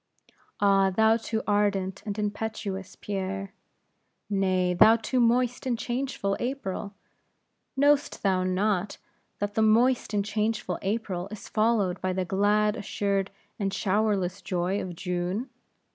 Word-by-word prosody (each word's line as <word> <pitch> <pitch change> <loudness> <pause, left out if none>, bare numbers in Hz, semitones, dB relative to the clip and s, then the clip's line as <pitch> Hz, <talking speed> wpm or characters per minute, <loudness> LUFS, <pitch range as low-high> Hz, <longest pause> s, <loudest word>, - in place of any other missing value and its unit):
"Ah! 195 -1 +4
thou 220 +4 +4
too 225 -1 -3
ardent 200 -2 0
and 205 0 -3
impetuous 205 -2 -4
Pierre!" 195 0 -4 0.8
"Nay, 185 -2 +2
thou 215 +5 +7
too 240 +3 -1
moist 245 +2 +2
and 240 -2 0
changeful 240 -4 -2
April! 215 -6 -4 0.8
know'st 285 +1 +2
thou 190 -2 +2
not, 190 +1 0 0.4
that 205 0 -3
the 220 - +1
moist 230 +2 +3
and 205 -2 0
changeful 210 -3 -1
April 195 -3 -2
is 215 0 -9
followed 215 -4 +1
by 185 0 0
the 185 0 -1
glad, 210 +3 +2
assured, 200 -2 -1 0.3
and 195 -1 0
showerless 200 -2 0
joy 185 +2 -1
of 180 -2 -6
June? 180 +8 -3
205 Hz, 130 wpm, -27 LUFS, 190-220 Hz, 0.8 s, thou